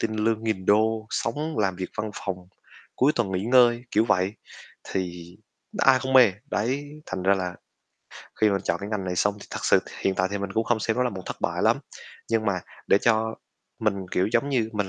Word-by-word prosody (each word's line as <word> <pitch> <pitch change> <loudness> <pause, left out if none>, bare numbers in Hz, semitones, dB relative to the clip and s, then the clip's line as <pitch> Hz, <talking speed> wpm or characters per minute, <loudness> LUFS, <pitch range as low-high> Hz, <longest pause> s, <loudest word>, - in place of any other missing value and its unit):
tin 110 -1 -1
lương 110 +1 0
nghìn 100 -4 -2
đô, 110 +1 +3
sống 150 +5 -2
làm 95 -4 +1
việc 95 0 -4
văn 110 0 -2
phòng, 95 -1 -4 0.6
cuối 140 +4 +4
tuần 110 -5 0
nghỉ 95 +1 -1
ngơi, 120 0 +5
kiểu 110 +2 +3
vậy, 100 -3 +1 0.6
thì 90 -1 -4 0.4
ai 135 -1 +5
không 130 +1 -3
mê? 125 -6 +7 0.2
Đấy, 130 +7 -1 0.2
thành 95 -1 -4
ra 95 +2 +4
là, 90 -2 -3 0.9
khi 110 - +5
mà 100 - +1
chọn - - 0
cái 100 - -5
ngành 105 -3 -2
này 90 -1 -3
xong 100 +3 +2
thì - - -11
thật - - -5
sự - - +5 0.2
hiện 95 - +1
tại 95 0 +1
thì 100 - -2
mình 100 -1 -4
cũng 110 +2 +1
không 115 -1 +1
xem 110 +1 0
nó 125 - +2
là 125 - 0
một 95 -2 -7
thất - - -5
bại - - -1
lắm, - - +4 0.5
nhưng 115 -1 +1
mà 95 -3 +1 0.3
để 100 - +5
cho 110 0 +1 0.4
mình, 105 -2 +1 0.2
kiểu, 95 +2 +2
giống 120 +4 +2
như 120 -6 +1
mình 105 -2 -1
110 Hz, 220 wpm, -25 LUFS, 95-115 Hz, 0.9 s, mê